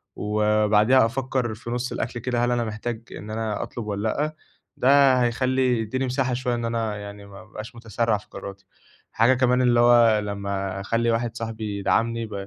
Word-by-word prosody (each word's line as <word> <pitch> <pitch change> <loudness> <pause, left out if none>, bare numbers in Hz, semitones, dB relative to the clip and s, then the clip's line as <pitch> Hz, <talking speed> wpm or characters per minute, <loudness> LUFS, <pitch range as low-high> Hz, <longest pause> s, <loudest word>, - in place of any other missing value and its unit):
وبعديها 105 +3 +3
أفكّر 130 -1 -2
في 115 +2 -9
نُصّ 125 +1 -2
الأكل 120 0 -3
كده 120 0 0
هل 120 - 0
أنا 120 -1 +1
محتاج 110 +1 -4
إن 105 - -9
أنا 110 -1 -3
أطلب 120 - -7
والَّا 105 +1 -2
لأ، 155 +6 -2 0.4
ده 135 0 +5
هيخلّي 125 0 +1
يديّني 130 +4 -2
مساحة 130 0 -1
شوية 125 0 -1
إن 120 0 -3
أنا 115 -2 -2
يعني 100 0 -9
ما 100 -1 -12
أبقاش 110 +2 -10
متسرّع 115 -1 -1
في 105 - -15
قراراتي، 100 0 -9 0.5
حاجة 115 +4 +4
كمان 125 0 +2
اللي 120 -1 +3
هو 120 -2 +5
لمّا 100 -2 -3
أخلّي 115 +4 0
واحد 115 0 -1
صاحبي 110 -3 -4
يدعمني 115 +3 0
ب 105 - -10
115 Hz, 180 wpm, -24 LUFS, 105-125 Hz, 0.5 s, ده